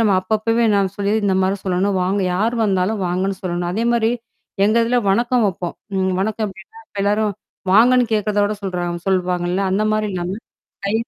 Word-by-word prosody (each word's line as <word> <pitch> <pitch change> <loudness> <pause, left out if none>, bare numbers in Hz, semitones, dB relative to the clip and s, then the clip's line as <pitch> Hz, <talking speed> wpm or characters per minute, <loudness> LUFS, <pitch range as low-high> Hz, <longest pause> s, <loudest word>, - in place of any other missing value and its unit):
நம்ம 215 -3 +3
அப்பப்பவே 225 +3 +1
நான் 195 -2 +2
சொல்லிர்றது, 205 +1 0
இந்த 190 - +2
மாரி 190 +1 +1
சொல்லணும். 190 +1 0
வாங்க 195 +2 0
யார் 220 +6 +1
வந்தாலும் 195 +1 +1
வாங்கன்னு 185 +2 -1
சொல்லணும். 175 -1 -2
அதே 225 +4 -1
மாரி 230 -1 +2 0.6
எங்க 215 +2 +2
இதில 245 +1 +2
வணக்கம் 240 +2 +2
வப்போம். 175 -1 -5 0.2
ம் 190 0 +1
வணக்கம் 215 +1 -1
எப்படின்னா, 215 - -14
இப்போ 200 - -6
எல்லாரும் 210 0 +1 0.4
வாங்கன்னு 245 +3 +5
கேக்கிறதோட 210 0 +1
சொல்றாங்க 175 -2 -3
சொல்லுவாங்கல்ல!? 180 0 0
அந்த 210 +2 +1
மாரி 215 0 0
இல்லாம 180 +3 -3 0.5
கை 200 - 0
200 Hz, 170 wpm, -20 LUFS, 185-220 Hz, 0.6 s, வாங்கன்னு